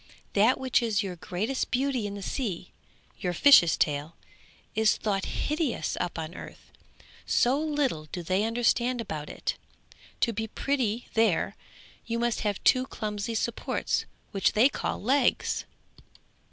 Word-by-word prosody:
That 220 +5 +4
which 260 -1 +2
is 225 -2 +1
your 185 -2 -4
greatest 200 +10 -2
beauty 255 -4 0
in 200 - -6
the 200 - -7
sea, 190 -7 -3 0.5
your 180 -1 -1
fish's 175 - +7
tail, 150 +2 0 0.6
is 220 0 +3
thought 200 -3 -1
hideous 300 - -1
up 175 - -3
on 160 +1 -5
earth, - - -11 0.6
so 255 +4 +3
little 290 - -1
do 175 +3 -6
they 185 +4 +1
understand 240 +2 +1
about 155 -9 -5
it; - - -3 0.6
to 230 - +2
be 220 +1 -3
pretty 245 -2 -1
there 225 -6 +2 0.5
you 230 0 -1
must 235 0 0
have 205 -3 -2
two 255 0 +4
clumsy 210 -1 -4
supports 230 +1 -1 0.3
which 195 -2 +2
they 235 +6 +5
call - - -3
legs!' 260 +3 +1
220 Hz, 140 wpm, -28 LUFS, 190-250 Hz, 0.6 s, fish's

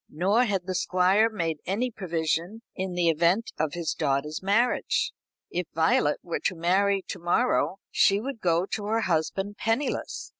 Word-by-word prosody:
Nor 200 +10 +2
had 195 -5 -1
the 185 - -3
Squire 185 +5 +3
made 165 -8 -2
any 230 +7 -1
provision 175 +2 -2
in 185 -1 -3
the 175 -1 +1
event 170 +7 +2
of 155 -1 0
his 170 -3 -2
daughter's 150 +1 -1
marriage. 235 - +1 0.4
If 180 -1 -2
Violet 160 -2 +2
were 170 - -3
to 185 - +1
marry 190 +4 +2
to - - -5
morrow, 185 +2 +1
she 200 +1 +4
would 250 0 -6
go 170 0 +2
to 205 +1 -4
her 225 +1 +1
husband 190 +3 -1
penniless. 230 +6 -2
185 Hz, 160 wpm, -26 LUFS, 165-210 Hz, 0.4 s, she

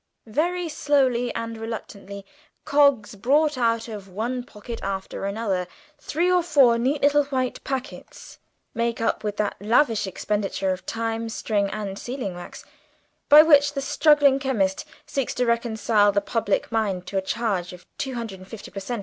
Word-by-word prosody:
Very 340 +9 -1
slowly 265 -5 +1
and 230 -1 -4
reluctantly 200 -3 -7 0.4
Coggs 280 -8 +3
brought 285 +9 +2
out 230 -2 0
of 210 -4 -8
one 235 +6 -3
pocket 230 0 -9
after 195 0 -4
another 200 -3 -2 0.3
three 345 +5 0
or 360 -1 +4
four 275 -8 +4
neat 275 +5 0
little 290 0 +4
white 260 -3 -2
packets, 265 0 -7 0.3
made 235 0 -1
up 225 - -1
with 210 -1 -3
that 210 -1 -1
lavish 225 0 +2
expenditure 195 0 -2
of 185 - -5
time, 225 0 -2
string, 205 -3 -1
and 200 -1 -5
sealing 245 -6 -4
wax, 175 0 -10 0.6
by 300 +1 +10
which 290 -2 +5
the 280 - -2
struggling 285 -1 +4
chemist 215 -9 0 0.2
seeks 275 -3 -3
to 250 - +1
reconcile 225 -3 +2
the 200 - +2
public 205 +1 -1
mind 200 -5 -1
to 195 +1 -1
a - - -3
charge 190 -3 -2
of 180 0 -13
two 265 -2 -3
hundred 225 -5 -5
and 185 - -13
fifty 225 0 -10
per 195 - -6
cent. 235 +4 -4
230 Hz, 165 wpm, -24 LUFS, 200-270 Hz, 0.6 s, by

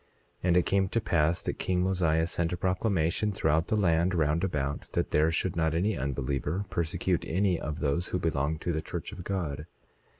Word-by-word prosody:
27:2 - - -37 0.4
And 90 0 +4
it 90 - +3
came 95 -1 +2
to 115 - +1
pass 85 -4 +1
that - - -3
king 90 -1 +1
Mosiah 85 -4 +2
sent 85 0 -1
a - - -2
proclamation 95 +1 +1
throughout 80 -3 +1
the - - +1
land 90 -2 +2
round 80 +1 +1
about 70 -6 -2
that - - -1
there 80 +2 +3
should 90 +2 -1
not 80 -1 +1
any 100 +5 +1
unbeliever 70 +6 -2
persecute 85 +1 0
any 90 0 +1
of 75 +2 -4
those 80 +4 0
who - - -1
belonged 80 -2 -1
to 85 - -1
the 80 - -1
church 85 +4 -6
of 95 -3 -8
God. 80 -6 -3
85 Hz, 200 wpm, -29 LUFS, 80-90 Hz, 0.4 s, And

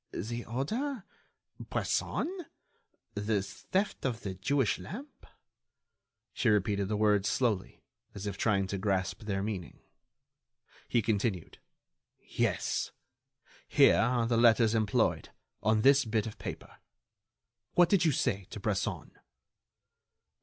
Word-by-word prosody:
"The 120 +4 -4
order?... 220 - -2 0.6
Bresson?... 355 -2 -2 0.7
the 105 -1 0
theft 185 - -2
of 120 -3 -2
the 95 - -4
Jewish 110 +5 0
lamp?" 225 - -9 1.1
She 120 - +1
repeated 100 -1 +1
the 105 +1 -1
words 105 -1 +3
slowly, 110 -7 -1 0.3
as 100 0 -6
if 100 -2 -3
trying 100 -1 +1
to 100 - -2
grasp 95 -2 -1
their 100 -2 -2
meaning. 95 -7 -5 1.1
He 120 - +2
continued: 105 -4 -1 0.6
"Yes. - - -1 0.8
Here - - +5
are 120 0 +2
the 115 0 +1
letters 115 -1 +5
employed... 110 -2 +1 0.3
on 110 0 +2
this 140 0 +6
bit 110 -2 0
of 110 - -8
paper.... - - -7 1.0
What 175 -1 +6
did 190 -3 +4
you 160 - +4
say 100 -7 -1
to 105 - -7
Bresson?" 100 -1 -2
110 Hz, 115 wpm, -31 LUFS, 100-125 Hz, 1.1 s, this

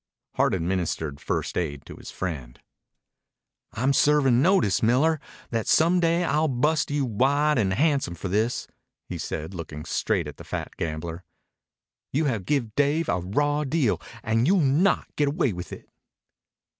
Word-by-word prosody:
Hart - - +2
administered 85 -4 -2
first - - -2
aid 70 -5 -3
to - - -10
his - - -11
friend. 75 -10 -5 1.1
"I'm 130 +5 +1
servin' 135 -4 +4
notice, 170 - +3
Miller, 140 +8 +3 0.3
that 115 -2 -1
some 170 +3 +4
day 170 +1 +2
I'll 155 -1 +1
bust 150 +4 +1
you 145 -1 0
wide 135 +5 +2
and 95 -3 +1
handsome 140 - +1
for 90 - -5
this," 110 +6 0 0.4
he - - -5
said, 80 +5 -5
looking 75 -3 -7
straight 95 0 0
at 75 - -9
the - - -10
fat - - -5
gambler. 80 +2 -4 0.9
"You 150 +4 +1
have 115 -9 -1
give 130 -8 0
Dave 145 +5 +1
a - - +1
raw 145 +12 0
deal, 140 -5 0 0.2
and 115 +3 +1
you'll 190 0 +4
not 150 +8 +2
get 145 - +2
away 140 - +1
with 90 0 -7
it." - - -9
125 Hz, 155 wpm, -25 LUFS, 90-150 Hz, 1.1 s, servin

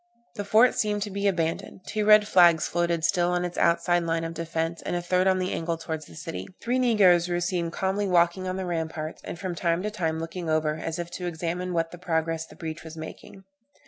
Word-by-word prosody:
The 205 - -5
fort 225 +4 +5
seemed 210 -1 0
to 205 - -6
be 200 +1 -1
abandoned; 170 -1 -1
two 210 0 -2
red 210 0 +7
flags 175 -5 +5
floated 170 -1 0
still 175 -1 +2
on 180 0 0
its 175 - -4
outside 175 +1 +3
line 165 -1 -1
of 165 0 -4
defence, 165 0 -3
and - - -3
a 175 - -1
third 180 +1 +2
on 190 0 +4
the 185 0 -1
angle 165 0 -2
towards 160 -1 -5
the - - -14
city. 95 -12 -6
Three 245 +2 0
negroes 190 -8 +4
were 175 0 0
seen 175 -1 -1
calmly 190 +4 -1
walking 175 +1 +2
on 185 0 -2
the 190 - -3
ramparts, 160 -2 -4
and - - -6
from 185 0 -4
time 170 +1 0
to 210 - -2
time 165 -6 -1
looking 165 +1 -5
over, 155 -1 +1
as 160 0 -4
if 175 0 -5
to 180 0 -4
examine 175 +2 -3
what 165 -1 -1
progress 160 -2 -1
the - - -15
breach 160 -1 -6
was 160 0 -10
making. 160 +4 -10
175 Hz, 225 wpm, -26 LUFS, 165-185 Hz, -, red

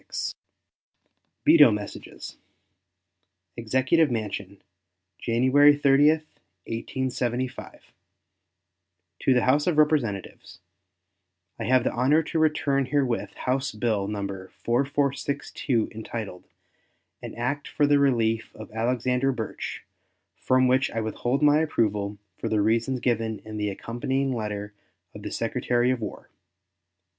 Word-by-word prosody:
GRANT. - - -4 1.1
VETO 315 - +8
MESSAGES. 105 -1 -7 1.2
EXECUTIVE 130 +7 +2
MANSION, 100 -4 -4 0.6
January 130 +5 +4
30, 145 0 +5 0.6
1875. 125 +1 -3 1.4
To 135 - +3
the 125 - +3
House 145 +5 +2
of 170 -4 +1
Representatives: 140 -11 0 1.0
I - - -3
have 130 0 +3
the - - 0
honor 140 +6 +2
to 160 - -2
return 145 -3 +1
herewith 130 -4 -1
House 130 +2 -1
bill 105 -3 -1
No. 100 -1 -3
4462, 130 +5 -1
entitled 110 -4 -7 0.8
"An - - -8
act 130 +5 -2
for 145 - +1
the 145 0 +4
relief 115 -5 +1
of 110 - -10
Alexander 125 +3 0
Burtch," 115 -4 -5 0.5
from 130 0 +2
which 130 +1 +2
I 115 - -3
withhold 120 +5 -1
my 150 +1 +5
approval 105 -9 0 0.2
for - - -3
the 110 -1 +1
reasons 115 +4 +1
given 115 -3 0
in 110 0 -7
the 105 -1 -1
accompanying 130 +6 -2
letter 105 -3 -4 0.4
of - - -10
the - - -5
Secretary 120 +1 0
of 125 -2 -2
War. 105 - -7
125 Hz, 115 wpm, -25 LUFS, 110-140 Hz, 1.4 s, VETO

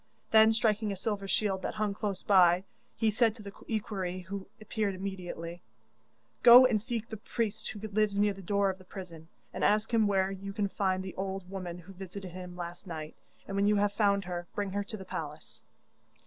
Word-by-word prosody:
Then, 220 0 +7
striking 220 -1 +1
a - - -2
silver 200 0 -3
shield 195 -1 +1
that - - -3
hung 215 -1 0
close 200 -2 -3
by, 180 -2 +5 0.3
he 220 -2 +2
said 225 0 +3
to 220 - -11
the 200 -1 -8
equerry 190 -4 -2
who 190 +2 -6
appeared 215 -2 -2
immediately: 180 -3 -6 0.8
'Go 245 +1 +10
and 225 -5 +2
seek 230 -1 -3
the 220 - -6
priest 220 0 -2
who 215 0 -6
lives 210 -1 +1
near 205 0 +3
the 195 - -10
door 200 +1 +2
of 190 - -11
the - - -14
prison, 175 -4 -9 0.3
and - - -3
ask 215 +2 +2
him 220 -2 +4
where 195 -1 +2
you 195 +1 -6
can 205 -1 0
find 190 -1 0
the 190 - -6
old 190 -1 -4
woman 180 -3 -5
who 180 +2 -12
visited 190 0 -8
him 180 0 -8
last 175 +2 -7
night; 155 -2 -6 0.3
and 195 - -4
when 200 +1 +3
you 210 - +4
have 205 0 +2
found 200 -2 +2
her, 175 -1 -4
bring 200 -2 -2
her 205 +1 -1
to 215 - -6
the 190 - -9
palace. - - -7
200 Hz, 205 wpm, -30 LUFS, 185-215 Hz, 0.8 s, Go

